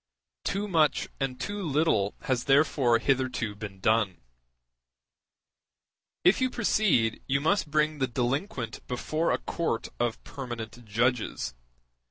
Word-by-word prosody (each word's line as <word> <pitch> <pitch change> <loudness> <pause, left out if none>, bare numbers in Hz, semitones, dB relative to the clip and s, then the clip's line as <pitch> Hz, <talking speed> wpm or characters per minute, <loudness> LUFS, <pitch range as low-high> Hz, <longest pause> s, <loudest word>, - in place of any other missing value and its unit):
Too 200 +2 -1
much 160 -6 +2
and 135 -2 -2
too 205 +5 -3
little 145 - +1
has 130 -3 -1
therefore 135 -4 +4
hitherto 130 -3 0
been 100 -2 -8
done. 105 -2 +2 2.0
If 185 +8 +5
you 255 - +3
proceed, 205 - +2
you 135 0 +2
must 165 +2 +1
bring 155 0 +1
the 130 - +2
delinquent 125 - -2
before 155 +6 -1
a - - +2
court 165 -9 -2
of 120 -1 -1
permanent 120 -3 -7
judges. 115 - 0
130 Hz, 120 wpm, -28 LUFS, 115-155 Hz, 2.0 s, If